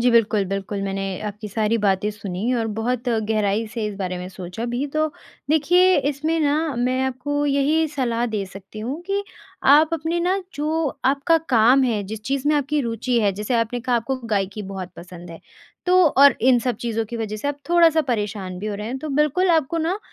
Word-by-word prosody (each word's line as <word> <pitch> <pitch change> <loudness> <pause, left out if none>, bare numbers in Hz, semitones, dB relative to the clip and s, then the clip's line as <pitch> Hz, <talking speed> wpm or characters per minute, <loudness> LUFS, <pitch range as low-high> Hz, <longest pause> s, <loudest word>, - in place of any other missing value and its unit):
जी 245 +1 +4
बिल्कुल, 215 -3 +3
बिल्कुल 195 +1 -3
मैंने 195 0 -2 0.2
आपकी 210 +1 -6
सारी 220 +2 0
बातें 200 0 +1
सुनी 205 +2 -3
और 230 -2 0
बहुत 245 +2 -1
गहराई 220 -1 0
से 225 -3 -3
इस 210 - -4
बारे 185 -2 -3
में 180 0 -6
सोचा 185 +3 -7
भी। 245 +4 -2
तो 310 0 +2 0.4
देखिए 355 +5 +4
इसमें 310 +4 -1
ना 290 -1 +2 0.2
मैं 250 +2 0
आपको 290 +3 -2
यही 290 +3 +2
सलाह 245 -5 -1
दे 200 - -1
सकती 195 +2 -11
हूँ 260 +9 -4
कि 400 +1 0 0.5
आप 315 +2 +3
अपने 330 +2 -2
ना 370 +3 +1
जो 310 +2 -1 0.2
आपका 280 +5 +3 0.2
काम 240 +4 +5
है 220 -4 0
जिस 215 +2 -6
चीज़ 275 +2 -2
में 305 - +3
आपकी 290 +1 0
रूचि 235 0 -1
है, 205 -2 +2
जैसे 210 +5 -3
आपने 230 +1 0
कहा 245 0 +1
आपको 235 +3 -2 0.2
गायकी 195 +2 -3
बहुत 190 -2 -7
पसंद 175 0 -11
है। 165 - -10 0.5
तो 360 - +3 0.2
और 280 -2 +8
इन 250 - +6
सब 240 -1 -2
चीज़ों 225 -2 -1
की 235 - -4
वजह 215 -2 -3
से 285 +7 -3
आप 285 - -3
थोड़ा-सा 335 -2 +5
परेशान 205 -5 -2
भी 205 - -5
हो 210 - -2
रहे 210 +1 -5
हैं। 255 +3 -3
तो 310 - -6
बिल्कुल 300 +6 +2
आपको 325 0 +1
ना 335 +5 -1
240 Hz, 205 wpm, -22 LUFS, 210-290 Hz, 0.5 s, और